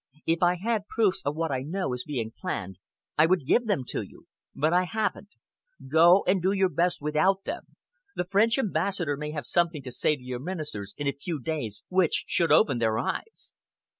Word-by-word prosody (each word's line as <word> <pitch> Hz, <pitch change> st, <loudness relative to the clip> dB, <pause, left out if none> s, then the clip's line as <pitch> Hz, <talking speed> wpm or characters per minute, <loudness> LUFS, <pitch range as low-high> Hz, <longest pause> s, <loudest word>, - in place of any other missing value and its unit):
If 165 Hz, +1 st, +1 dB
I 175 Hz, 0 st, +4 dB
had 210 Hz, +2 st, -2 dB
proofs 200 Hz, -4 st, +1 dB
of 145 Hz, +1 st, -1 dB
what 165 Hz, -1 st, -1 dB
I 130 Hz, -1 st, -1 dB
know 160 Hz, 0 st, -2 dB
is 125 Hz, 0 st, -4 dB
being 120 Hz, -7 st, -3 dB
planned, 95 Hz, -2 st, -5 dB, 0.4 s
I 155 Hz, -, +7 dB
would 180 Hz, -5 st, +1 dB
give 235 Hz, -, +2 dB
them 190 Hz, -11 st, +1 dB
to -, -, -2 dB
you! -, -, -12 dB, 0.3 s
But 155 Hz, +4 st, +1 dB
I 180 Hz, +1 st, +3 dB
haven't. 210 Hz, +2 st, -3 dB, 0.5 s
Go 170 Hz, +6 st, +6 dB
and 185 Hz, 0 st, +2 dB
do 190 Hz, +3 st, +2 dB
your 190 Hz, -2 st, +2 dB
best 175 Hz, -3 st, 0 dB
without 185 Hz, +6 st, +2 dB
them. 330 Hz, +4 st, -6 dB, 0.4 s
The 180 Hz, -, -1 dB
French 210 Hz, +6 st, +3 dB
ambassador 185 Hz, -, 0 dB
may 150 Hz, +1 st, -5 dB
have 150 Hz, -3 st, -5 dB
something 170 Hz, -1 st, 0 dB
to 125 Hz, -, -7 dB
say 150 Hz, -, +1 dB
to 130 Hz, -, -15 dB
your 125 Hz, -1 st, -5 dB
ministers 145 Hz, -, -6 dB
in 145 Hz, -, -4 dB
a 140 Hz, -, +2 dB
few 150 Hz, +3 st, -5 dB
days 125 Hz, -7 st, -4 dB
which 185 Hz, -3 st, +2 dB
should 170 Hz, -, +1 dB
open 130 Hz, -5 st, +4 dB
their 110 Hz, -1 st, +1 dB
eyes." 135 Hz, -, -4 dB
165 Hz, 200 wpm, -27 LUFS, 140-190 Hz, 0.5 s, I